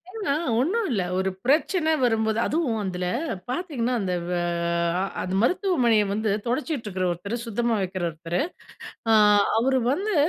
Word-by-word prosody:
ஏன்னா. 395 -9 -1 0.3
ஒண்ணுல்ல. 315 - 0 0.2
ஒரு 190 0 0
பிரச்சனை 315 +4 +2
வரும்போது 220 -2 +2
அதுவும் 280 -8 0
அதில, 180 -2 -3 0.4
பாத்தீங்கன்னா 255 -5 -2
அந்த 185 -2 -2 0.2
வே 180 - 0 0.6
அ - - +1 0.2
அது 185 - -4
மருத்துவமனைய 255 - +3
வந்து 215 +1 0 0.2
தொடச்சிகிட்டுருக்கிற 235 - -2
ஒருத்தரு, 200 +6 -3
சுத்தமா 235 0 0
வைக்கிற 185 -1 -3
ஒருத்தரு. 165 +2 -3 0.7
அ - - +6 0.5
அவரு 260 +3 +2
வந்து 400 +8 0
235 Hz, 130 wpm, -25 LUFS, 195-305 Hz, 0.7 s, அ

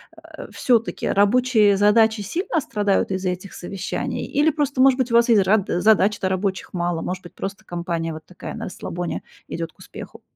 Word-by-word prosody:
э, - - -11
всё-таки 235 -3 0
рабочие 210 0 +4
задачи 215 +2 +4
сильно 325 - -2
страдают 205 -5 0
из-за 190 -1 -1
этих 185 +2 -8
совещаний 190 +2 -4
или 295 +2 +2
просто, 285 -3 -2
может 265 -1 +5
быть, 255 -2 -1
у - - +2
вас 235 +1 +5
и 230 - +6
з - - +5
ра 200 +1 +3
задач-то 200 +1 +2
рабочих 190 0 -2
мало, 175 -2 -1
может 185 +1 -4
быть, 175 - -12
просто 195 +1 -6
компания 170 -2 -3
вот 155 - -10
такая, 180 - -9
на - - -6
расслабоне 175 -1 -5 0.3
идёт 165 -1 -5
к - - -42
успеху? - - -11
200 Hz, 185 wpm, -22 LUFS, 180-230 Hz, 0.3 s, и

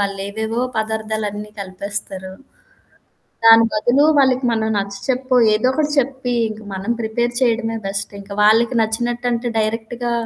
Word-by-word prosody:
వాళ్ళేవేవో 200 +3 -2 0.2
పదార్థాలన్నీ 215 -1 -3
కలిపేస్తారు. 190 0 -6 1.1
దాని 225 0 +8
బదులు 240 +7 +3
వాళ్ళకి 260 -1 +3
మనం 220 -1 0
నచ్చచెప్పొ 250 +7 -2 0.2
ఏదో 220 +3 +1
ఒకటి 300 +1 0
చెప్పి 260 -1 -1 0.2
ఇంక 215 0 -8
మనం 190 +4 -4
ప్రిపేర్ 235 +2 -1
చేయడమే 230 -2 +1
బెస్ట్. 195 +1 -4
ఇంక 200 +1 -14
వాళ్ళకి 230 +3 +4
నచ్చినట్టంటే 240 +2 -1
డైరెక్ట్‌గా 225 +2 -2
220 Hz, 115 wpm, -19 LUFS, 210-240 Hz, 1.1 s, దాని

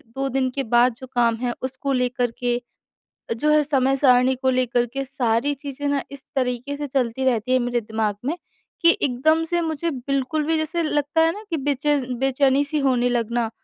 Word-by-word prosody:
2 270 0 -1
दिन 265 0 0
के 275 - -1
बाद 240 +1 +5
जो 260 - -9
काम 235 -1 +3
है 245 -1 -1
उसको 260 +2 -3
लेकर 250 -1 0
के 245 0 0 0.8
जो 300 +6 +1
है 300 0 +5
समय-सारणी 265 -2 +3
को 260 +1 0
लेकर 245 -1 +1
के 275 0 -2
सारी 250 0 0
चीज़ें 280 0 -6
ना 285 -1 0
इस 280 0 -11
तरीके 255 +2 -1
से 290 0 -4
चलती 260 -1 -1
रहती 250 -1 +1
हैं 255 - +5
मेरे 240 0 0
दिमाग 220 -2 -2
में 310 +6 -1 0.5
कि 335 0 +6
एकदम 310 +5 +2
से 345 0 +1
मुझे 325 0 -2
बिल्कुल 275 +2 -2
भी 325 +1 +2
जैसे 320 +2 -1
लगता 295 0 0
है 325 0 +4
ना 420 +4 -9
कि 330 - 0
बेचेस 285 0 0 0.2
बेचैनी 270 +1 +3
सी 300 +2 -2
होने 255 -3 +2
लगना। 235 -1 0
265 Hz, 195 wpm, -22 LUFS, 245-290 Hz, 0.8 s, कि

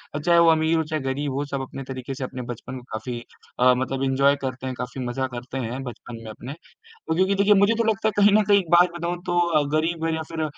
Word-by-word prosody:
अ, - - -1
चाहे 170 +2 +4
वो 170 0 +6
अमीर 160 +1 +2
हो, 160 - +1
चाहे 155 -1 -3
गरीब 135 +2 -2
हो 140 +2 -2
सब 140 -1 -4
अपने 135 +1 -7
तरीके 130 0 -6
से 135 - -5
अपने 130 0 -5
बचपन 120 +2 -7
को - - -15
काफ़ी 120 +2 -4 0.4
अ, 125 0 +6
मतलब 130 +1 -2
एन्जॉय 140 +1 +3
करते 130 -1 -4
हैं 130 - -4
काफ़ी 125 +1 -5
मजा 130 +2 -2
करते 125 +2 -6
हैं 125 +4 -4
बचपन 120 -2 -9
में 110 - -8
अपने, 120 +4 -9
अ 450 - -9
क्योंकि 190 +3 +2
देखिए 200 +1 +4
मुझे 200 +2 +4
तो 230 - +2
लगता 220 0 0
है - - +2
कहीं 205 0 +6
न - - +3
कहीं 205 -1 +6
एक 180 -4 -6
बात 175 +1 +6
बताऊँ 170 +1 -2
तो 170 -4 +2
गरीब 165 +1 -1
या 160 - -3
फिर 160 -1 -2
140 Hz, 255 wpm, -24 LUFS, 130-170 Hz, 0.4 s, वो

